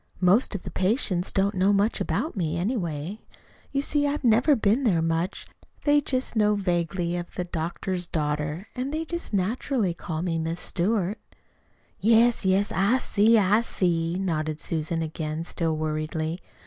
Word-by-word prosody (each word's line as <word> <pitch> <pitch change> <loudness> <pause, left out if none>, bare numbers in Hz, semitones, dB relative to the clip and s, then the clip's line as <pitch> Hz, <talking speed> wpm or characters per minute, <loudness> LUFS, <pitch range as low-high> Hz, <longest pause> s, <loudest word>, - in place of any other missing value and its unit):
Most 190 +6 +3
of 190 - -5
the - - -7
patients 190 -3 +1
don't 200 +1 +1
know 190 +2 +3
much 205 +3 +1
about 315 - -1
me, 170 -4 -1
anyway. 175 - -2 0.5
You 275 0 0
see, 290 0 +1
I've 285 0 -2
never 245 +5 +4
been 225 +3 +2
there 195 -9 +3
much. 165 +3 -1 0.4
They 290 0 +4
just 260 -3 -1
know 210 -1 +3
vaguely 175 -2 -1
of 175 0 -7
'the 180 - -1
doctor's 175 +1 -3
daughter,' 150 +2 -2
and 260 +2 -3
they 315 +2 -2
just 340 +1 -4
naturally 210 +1 0
call 165 -1 -5
her 165 -2 -1
'Miss 165 +2 -3
Stewart.'" 200 +2 -1 0.8
"Yes, 230 +2 +4
yes, 190 +2 +2
I 200 +7 +3
see, 225 -2 +3
I 210 +2 +4
see," 170 -6 0
nodded 155 -5 -2
Susan, 165 0 -2
again 155 0 -4
still 165 -2 -2
worriedly. 155 +2 -2
185 Hz, 160 wpm, -26 LUFS, 165-225 Hz, 0.8 s, never